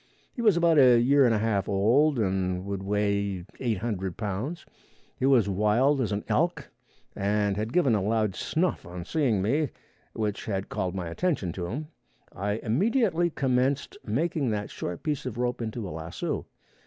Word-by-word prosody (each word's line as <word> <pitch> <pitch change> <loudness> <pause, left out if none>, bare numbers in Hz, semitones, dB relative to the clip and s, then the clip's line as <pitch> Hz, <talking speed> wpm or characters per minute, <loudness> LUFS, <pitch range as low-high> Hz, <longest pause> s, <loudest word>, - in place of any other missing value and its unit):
He 240 - -5
was 215 -6 +4
about 170 -3 +4
a 125 -3 +7
year 135 +3 +5
and 115 - +3
a - - +2
half 105 -2 0
old 120 +9 +3
and 95 -3 0
would 100 -1 -3
weigh 100 -2 -1
800 105 -6 -2
pounds. 110 - -4 0.5
He 130 - 0
was 125 -7 +4
wild 105 +8 +2
as 110 - -1
an 100 0 -2
elk 170 +3 0 0.4
and 100 0 +1
had 110 +3 -3
given 140 -6 +3
a 105 - +2
loud 105 0 +1
snuff 165 - -1
on 90 0 -8
seeing 125 -11 +1
me, 140 +7 +1 0.4
which 105 -2 -3
had 95 -2 -3
called 90 0 -2
my 90 -3 -3
attention 100 - -1
to 85 0 -4
him. 150 - -5 0.5
I 100 +2 -1
immediately 175 - +2
commenced 135 -1 0
making 140 +4 0
that 105 -1 -3
short 85 -1 -5
piece 150 -4 -2
of 120 - -5
rope 125 0 -1
into 110 -2 -4
a - - -6
lasso. 80 +2 -4
110 Hz, 170 wpm, -27 LUFS, 100-140 Hz, 0.5 s, a